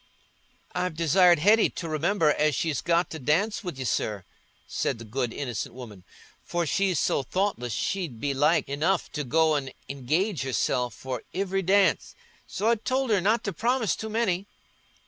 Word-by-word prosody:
"I've 180 Hz, -3 st, -2 dB
desired 175 Hz, +2 st, +5 dB
Hetty 210 Hz, +8 st, +4 dB
to 165 Hz, -, -6 dB
remember 160 Hz, +1 st, +2 dB
as 150 Hz, 0 st, +1 dB
she's 155 Hz, -5 st, -1 dB
got 170 Hz, +1 st, +1 dB
to 160 Hz, -, -6 dB
dance 175 Hz, -, 0 dB
wi' 180 Hz, -, -4 dB
you, 130 Hz, 0 st, -5 dB
sir," 105 Hz, -3 st, -1 dB, 0.4 s
said -, -, -2 dB
the 115 Hz, -, -10 dB
good 120 Hz, +2 st, -2 dB
innocent 120 Hz, -4 st, -4 dB
woman; 110 Hz, -8 st, -10 dB, 0.4 s
"for 175 Hz, -1 st, -2 dB
she's 190 Hz, +2 st, +1 dB
so -, -, +1 dB
thoughtless, 180 Hz, -, -2 dB
she'd 170 Hz, -, -2 dB
be 140 Hz, +1 st, -1 dB
like 150 Hz, +4 st, +2 dB
enough 150 Hz, +7 st, 0 dB
to 150 Hz, -, -3 dB
go 155 Hz, +3 st, +2 dB
an' 135 Hz, -2 st, -2 dB, 0.2 s
engage 155 Hz, -, -1 dB
herself 125 Hz, -3 st, -1 dB
for 130 Hz, -3 st, -5 dB
ivery 195 Hz, 0 st, 0 dB
dance. 195 Hz, +1 st, +2 dB, 0.3 s
So 210 Hz, -, -2 dB
I 235 Hz, -, +3 dB
told 260 Hz, +3 st, -1 dB
her 200 Hz, -3 st, +3 dB
not 215 Hz, +5 st, +2 dB
to 200 Hz, -, -3 dB
promise 235 Hz, +1 st, +1 dB
too 220 Hz, -, -6 dB
many." 205 Hz, -4 st, 0 dB
165 Hz, 170 wpm, -26 LUFS, 135-195 Hz, 0.4 s, desired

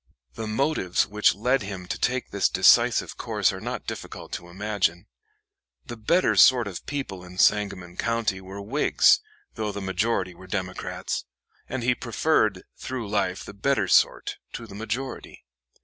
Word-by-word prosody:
The 110 Hz, -1 st, -5 dB
motives 110 Hz, -, +1 dB
which 105 Hz, +1 st, +2 dB
led 125 Hz, +6 st, +1 dB
him 95 Hz, -3 st, -6 dB
to -, -, -4 dB
take 130 Hz, 0 st, -1 dB
this 100 Hz, -3 st, +2 dB
decisive -, -, +4 dB
course -, -, +1 dB
are -, -, -7 dB
not -, -, -5 dB
difficult -, -, -7 dB
to 85 Hz, -, -6 dB
imagine. 95 Hz, -2 st, -1 dB, 0.8 s
The 120 Hz, -, -7 dB
better 170 Hz, +12 st, +2 dB
sort 125 Hz, -4 st, +6 dB
of 95 Hz, -3 st, -7 dB
people 135 Hz, -11 st, -4 dB
in 90 Hz, 0 st, -12 dB
Sangamon 95 Hz, -4 st, +1 dB
County 115 Hz, -5 st, -1 dB
were 95 Hz, +2 st, -8 dB
Whigs, 135 Hz, +9 st, +4 dB, 0.3 s
though 110 Hz, -2 st, -3 dB
the 100 Hz, -, -5 dB
majority 95 Hz, 0 st, -1 dB
were 95 Hz, +2 st, -14 dB
Democrats, 95 Hz, -1 st, -4 dB, 0.4 s
and 130 Hz, -2 st, -3 dB
he 125 Hz, +1 st, +3 dB
preferred 115 Hz, -5 st, +1 dB, 0.2 s
through 125 Hz, -5 st, -5 dB
life 95 Hz, -3 st, -1 dB
the -, -, -9 dB
better 105 Hz, -1 st, +1 dB
sort -, -, +3 dB, 0.2 s
to 115 Hz, -, -6 dB
the 105 Hz, -, -12 dB
majority. 115 Hz, -, -5 dB
105 Hz, 155 wpm, -25 LUFS, 95-120 Hz, 0.8 s, sort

